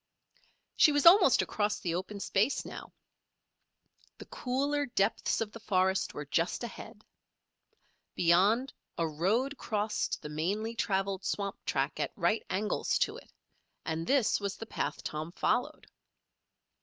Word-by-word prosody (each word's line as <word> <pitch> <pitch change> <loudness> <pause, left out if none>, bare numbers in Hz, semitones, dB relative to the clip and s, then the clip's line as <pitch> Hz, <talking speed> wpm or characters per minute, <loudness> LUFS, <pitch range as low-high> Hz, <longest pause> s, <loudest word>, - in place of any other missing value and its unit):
She 305 - +6
was 290 -1 +1
almost 350 - +7
across 210 -1 -1
the 170 -3 -2
open 190 +4 -4
space 205 +6 0
now. - - -9 1.3
The - - -10
cooler 280 +3 -1
depths 200 -4 0
of 215 -2 -2
the 230 - -10
forest 190 -2 0
were 150 - -5
just 165 - -1
ahead. 215 -2 -9 1.1
Beyond, 200 +10 +3 0.2
a 165 - +1
road 210 - 0
crossed 215 -1 -1
the 150 - -6
mainly 200 +9 -2
traveled 195 -3 -1
swamp 200 0 -3
track - - -1
at - - -2
right 220 - +1
angles 210 +3 0
to - - 0
it, - - -15 0.5
and 160 +1 -3
this 270 -5 +3
was 200 -1 -4
the 225 - -7
path - - -4
Tom 155 +3 -5
followed. 295 +10 -1
205 Hz, 135 wpm, -31 LUFS, 185-240 Hz, 1.3 s, almost